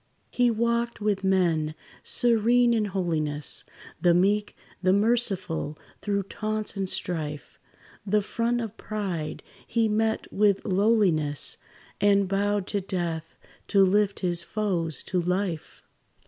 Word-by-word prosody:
He 245 -1 +3
walked 235 +1 0
with 205 -2 0
men, 170 -5 +1 0.3
serene 240 0 +3
in 220 -2 +1
holiness, 160 -7 -1 0.4
The 175 -2 +4
meek, 205 +4 +1 0.2
the 185 0 +3
merciful, 195 -8 +1 0.2
through 200 -1 -1
taunts 215 +2 -3
and 195 -2 -1
strife; 150 -7 -3 0.4
The 210 +1 +1
front 235 +3 -1
of 225 -2 -5
pride 185 -8 -4 0.2
he 230 -1 +1
met 220 +1 -1
with 200 -1 +2
lowliness, 190 -8 +2 0.4
And 200 -1 +4
bowed 200 +1 0
to 200 - +1
death 170 -4 -4 0.3
to 195 -1 +5
lift 200 +1 +1
his 175 -2 +1
foes 170 -6 -1
to 180 -1 -1
life. 180 -1 -3
200 Hz, 120 wpm, -26 LUFS, 175-215 Hz, 0.4 s, to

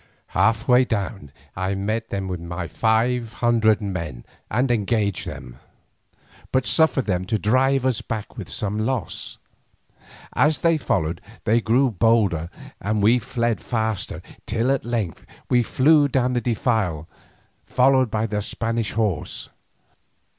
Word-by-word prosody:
Half 115 +4 +2
way 125 0 +6
down 100 -5 -3
it - - -29
I 95 +2 -1
met 110 +4 -2
them 95 -1 -3
with 90 -2 -3
my 85 +1 -5
five 115 +2 +1
hundred 115 -3 +2
men 85 -11 -5 0.2
and 125 +1 +1
engaged 105 -3 0
them, - - -8 0.9
but 130 -1 +1
suffered 160 -5 +3
them 90 -3 0
to 110 +3 0
drive 130 +5 +2
us 130 -4 +1
back 110 -3 -5
with - - -7
some 105 +1 -2
loss. 115 +2 -3 1.0
As 150 0 +3
they 165 -1 +4
followed 80 - -1 0.2
they 115 +3 +3
grew 125 +4 +3
bolder 100 -6 +2 0.3
and 105 0 0
we 115 +4 +5
fled 115 0 -1
faster, 110 -4 -2 0.2
till 115 +4 +1
at 135 - 0
length 115 -8 -3 0.2
we 125 - +5
flew 145 +5 +4
down 130 -2 +1
the 120 - 0
defile 110 - 0 0.6
followed 130 -1 +3
by 110 +1 0
the 105 -2 -2
Spanish 115 0 -2
horse. 105 -7 -2
115 Hz, 140 wpm, -23 LUFS, 100-125 Hz, 1.0 s, way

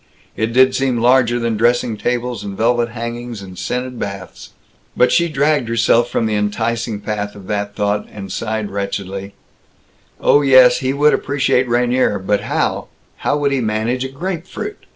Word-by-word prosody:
It 110 +2 -1
did 130 +2 +5
seem 135 -2 0
larger 120 0 +3
than 115 -2 -1
dressing 120 0 +2
tables 120 +2 -2
and 100 -1 -6
velvet 120 +1 +1
hangings 115 -2 -6
and 95 -1 -10
scented 125 +7 -4
baths. 100 -2 -7 0.5
But 125 - +4
she 170 0 +3
dragged 145 -4 +1
herself 115 +1 +3
from 115 - 0
the 110 - -1
enticing 110 +1 -1
path 105 -1 -4
of 100 -2 -12
that 100 -1 -2
thought, 105 0 -1
and 100 -2 -8
sighed 110 -2 -3
wretchedly, 100 0 -4 0.8
"Oh, 145 - +4
yes, 130 -3 +6
he 130 0 -1
would 145 +2 +3
appreciate 130 -2 +1
Rainier, 120 -2 +2
but 100 +2 0
how - - -1 0.3
how - - 0
would 145 -1 0
he 135 -2 0
manage 110 +3 -1
a 135 - -4
grape 170 +5 -5
fruit? 415 - -7
120 Hz, 170 wpm, -18 LUFS, 105-130 Hz, 0.8 s, yes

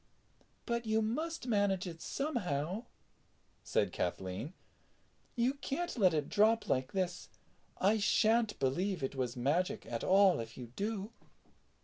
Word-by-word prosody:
"But 235 -1 -2
you 220 0 +3
must 315 +8 -2
manage 200 -5 +1
it 165 -2 -7
somehow," 200 - -2 0.8
said - - +1
Kathleen; 95 - -3 0.8
"you 245 +2 +2
can't 295 +5 -3
let 195 -7 +5
it 150 -3 0
drop 220 +2 +3
like 130 0 0
this. 185 -2 -2 0.5
I 210 +3 +3
shan't 220 +1 +3
believe 175 +6 0
it 135 - -1
was 130 -2 -2
magic 150 +9 0
at 115 -1 -4
all 195 -3 +5
if 115 0 -7
you 120 -2 -8
do." 210 0 -3
195 Hz, 130 wpm, -34 LUFS, 140-225 Hz, 0.8 s, let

